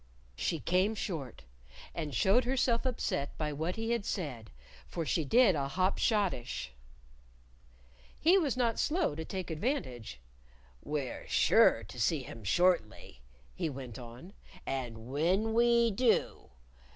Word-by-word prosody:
She 165 - -1
came 185 +7 +1
short. 155 - -5 0.5
And 150 -5 -4
showed 200 - +4
herself 250 -1 +1
upset 185 - -2
by 150 -1 -2
what 160 +5 -2
he 225 +1 -2
had 235 -3 0
said, 140 - -4 0.4
for 165 -2 -4
she 160 - 0
did 225 - +5
a 140 -3 -1
hop 185 +7 0
schottische. 195 - 0 1.5
He 345 +4 +5
was 295 -10 +1
not 235 -3 +1
slow 330 - +1
to 160 +2 -5
take 185 +1 -5
advantage. 150 - -3 0.6
"We're 145 -4 -4
sure - - +4
to - - -10
see - - +1
him 115 - -10
shortly," 110 - +1 0.3
he 160 - -2
went 130 -4 -8
on. 125 +10 -11 0.3
"And 120 -4 -4
when 185 +10 +1
we 235 0 +4
do 230 +3 +1
175 Hz, 135 wpm, -31 LUFS, 135-230 Hz, 1.5 s, did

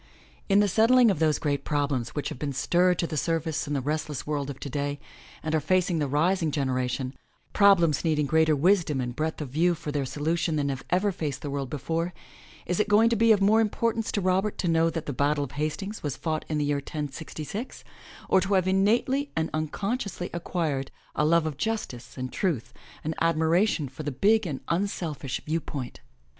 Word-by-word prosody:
In 200 +1 +5
the 205 - +3
settling 230 +3 +5
of 185 - -2
those 155 -2 +3
great 145 -2 -1
problems 140 -5 -1
which 145 - -2
have - - -8
been 140 -1 -2
stirred 180 +6 +2
to 170 - 0
the 160 - -4
surface 160 -1 -1
in 145 - -1
the 135 - 0
restless 150 0 -3
world 145 -2 -2
of 135 - -7
today 145 +1 -3 0.4
and 155 - -2
are 160 - +3
facing 180 0 +1
the 145 - 0
rising 165 +4 +1
generation, 130 -2 -1 0.4
problems 175 -7 +5
needing 155 -3 +1
greater 160 +1 +3
wisdom 165 -2 +2
and 125 -1 -3
breadth 160 +2 -2
of 145 - -4
view 170 +6 +2
for 150 - -5
their 145 -2 -1
solution 160 +4 -1
than 145 -2 0
have 135 -2 -4
ever 195 +3 +2
faced 150 -6 -4
the 145 - -3
world 140 -2 -3
before, 165 +5 -2 0.5
is 180 +2 -1
it 210 - +1
going 220 +2 +5
to - - +3
be 230 +1 +4
of 205 -2 +4
more 215 +3 +5
importance 225 +1 0
to 205 - 0
Robert 190 +3 +1
to 180 - -1
know 165 0 +3
that 165 -1 -4
the 145 - -3
Battle 145 +3 +1
of 140 - -6
Hastings 155 +9 -3
was 145 -4 -3
fought 155 -2 -2
in 155 - 0
the 150 - +1
year 145 0 +1
1066 155 - -6 0.4
or 190 - +4
to 195 +1 +1
have 185 -1 +2
innately 235 +9 +2
and 160 0 -1
uncon 195 +10 -2
sciously 185 -6 -5
acquired 160 -5 -2 0.2
a - - 0
love 165 +1 +3
of 155 -3 -3
justice 210 - -4
and 130 0 -5
truth, 125 - -1 0.3
an 160 - -2
admiration 165 +1 +2
for 130 +4 -9
the 145 -1 -3
big 205 - +3
and 140 -5 -4
unselfish 165 -7 -2
view 160 +2 0
point? 135 -4 -6
160 Hz, 205 wpm, -27 LUFS, 145-185 Hz, 0.5 s, In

